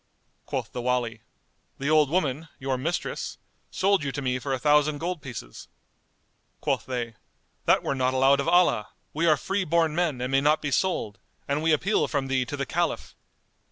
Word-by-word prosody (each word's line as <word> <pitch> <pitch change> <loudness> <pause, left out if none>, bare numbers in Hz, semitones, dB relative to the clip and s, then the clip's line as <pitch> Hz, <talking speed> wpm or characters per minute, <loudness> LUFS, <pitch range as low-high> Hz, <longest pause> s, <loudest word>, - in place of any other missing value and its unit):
Quoth - - -3
the 125 - -4
Wali, 120 -3 -1 0.6
"The 140 - -3
old 155 -3 +5
woman, 155 -2 0
your 135 0 -2
mistress, 155 +7 -3 0.3
sold 195 -3 +2
you 140 - -2
to 145 - -3
me 130 0 0
for 135 +2 -4
a 135 - +1
thousand 150 +2 +3
gold 175 +1 -3
pieces." 120 - -8 0.9
Quoth - - -1
they, 120 -3 -3 0.5
"That - - +4
were - - 0
not 130 -1 0
allowed 135 +2 +4
of 140 - -1
Allah; 175 -11 +4 0.3
we 165 +3 +1
are 155 -2 +5
free 195 +8 -1
born 165 -2 +2
men 160 -6 0
and 125 +1 -3
may 135 0 +3
not 150 +2 +3
be 145 - -3
sold, 110 - 0 0.3
and 140 +2 0
we 160 +1 +2
appeal 185 +8 +2
from 135 -3 -2
thee 130 -1 +1
to 145 +4 -5
the 140 - -2
Caliph." 170 +3 -2
140 Hz, 190 wpm, -26 LUFS, 130-160 Hz, 0.9 s, old